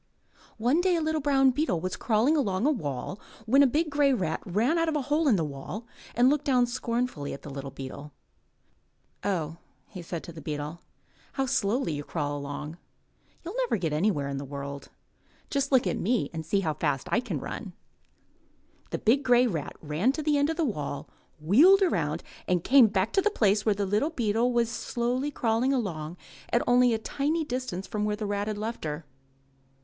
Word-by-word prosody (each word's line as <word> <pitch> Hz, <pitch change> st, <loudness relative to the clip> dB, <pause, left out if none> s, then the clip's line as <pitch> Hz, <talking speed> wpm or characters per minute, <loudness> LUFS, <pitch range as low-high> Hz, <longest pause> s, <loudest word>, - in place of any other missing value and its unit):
One 250 Hz, +9 st, +2 dB
day 365 Hz, -1 st, +3 dB
a -, -, +1 dB
little 315 Hz, 0 st, 0 dB
brown 270 Hz, -2 st, +4 dB
beetle 275 Hz, -, 0 dB
was 185 Hz, +3 st, -3 dB
crawling 235 Hz, +7 st, +2 dB
along 215 Hz, -7 st, 0 dB
a 300 Hz, -, +4 dB
wall 155 Hz, -, -4 dB, 0.3 s
when 265 Hz, +5 st, +5 dB
a 280 Hz, -, +7 dB
big 305 Hz, +4 st, 0 dB
grey 285 Hz, -1 st, +3 dB
rat 175 Hz, -10 st, -1 dB
ran 230 Hz, -, +2 dB
out 330 Hz, 0 st, +2 dB
of 310 Hz, -, -1 dB
a 295 Hz, -, 0 dB
hole 295 Hz, +4 st, +1 dB
in 245 Hz, -, +5 dB
the 170 Hz, -, +1 dB
wall 145 Hz, -, -6 dB, 0.3 s
and 245 Hz, +2 st, +5 dB
looked 295 Hz, +2 st, +2 dB
down 255 Hz, -4 st, +4 dB
scornfully 240 Hz, -, -2 dB
at 140 Hz, -, -9 dB
the 145 Hz, -, -8 dB
little 140 Hz, 0 st, -6 dB
beetle. 135 Hz, +2 st, -8 dB, 1.1 s
*'0 -, -, -1 dB
ho!'* 165 Hz, -4 st, -2 dB, 0.3 s
he 185 Hz, -, -8 dB
said 170 Hz, -1 st, -5 dB
to 170 Hz, -, -9 dB
the 160 Hz, -, -9 dB
beetle, 150 Hz, +2 st, -5 dB, 0.5 s
how 270 Hz, -, 0 dB
slowly 225 Hz, -, 0 dB
you 145 Hz, 0 st, -4 dB
crawl 145 Hz, -2 st, -3 dB
along. 145 Hz, +3 st, -6 dB, 0.7 s
You'll 350 Hz, -, -5 dB
never -, -, +1 dB
get 165 Hz, -5 st, -2 dB
anywhere 150 Hz, -3 st, +1 dB
in 140 Hz, 0 st, -3 dB
the -, -, -5 dB
world. 140 Hz, 0 st, -7 dB, 0.6 s
Just 275 Hz, 0 st, 0 dB
look 260 Hz, -4 st, +4 dB
at 180 Hz, -, -1 dB
me 215 Hz, -, 0 dB
and 160 Hz, -1 st, -4 dB
see 195 Hz, +5 st, +1 dB
how 160 Hz, -4 st, 0 dB
fast 145 Hz, -4 st, -1 dB
I -, -, +3 dB
can 210 Hz, -, -3 dB
run." 190 Hz, -, -6 dB, 1.2 s
The -, -, -2 dB
big 245 Hz, +6 st, +3 dB
grey 245 Hz, -2 st, +4 dB
rat 165 Hz, -, -3 dB
ran 160 Hz, -, +1 dB
to 310 Hz, -, -4 dB
the 300 Hz, 0 st, +2 dB
end 285 Hz, +1 st, +2 dB
of 325 Hz, -, -2 dB
the 330 Hz, -, +2 dB
wall, 150 Hz, -, -4 dB, 0.3 s
wheeled 305 Hz, -, +6 dB
around, 365 Hz, -, 0 dB, 0.2 s
and 180 Hz, -2 st, +1 dB
came 260 Hz, -3 st, +7 dB
back 200 Hz, +1 st, 0 dB
to 390 Hz, -, +4 dB
the 425 Hz, -, +2 dB
place 210 Hz, -, +2 dB
where 210 Hz, -, +4 dB
the 200 Hz, 0 st, -1 dB
little 210 Hz, +10 st, +1 dB
beetle 235 Hz, -4 st, +1 dB
was 235 Hz, -1 st, +2 dB
slowly 245 Hz, +4 st, -1 dB
crawling 240 Hz, -1 st, +1 dB
along 175 Hz, -, -3 dB, 0.3 s
at 240 Hz, -, +2 dB
only 245 Hz, 0 st, +5 dB
a -, -, 0 dB
tiny 295 Hz, +8 st, -1 dB
distance 250 Hz, -8 st, -4 dB
from 210 Hz, +2 st, -3 dB
where 210 Hz, 0 st, 0 dB
the 210 Hz, 0 st, -4 dB
rat 205 Hz, 0 st, -2 dB
had 215 Hz, -1 st, -2 dB
left 220 Hz, +3 st, -4 dB
her. 150 Hz, 0 st, -4 dB
220 Hz, 205 wpm, -28 LUFS, 165-270 Hz, 1.2 s, a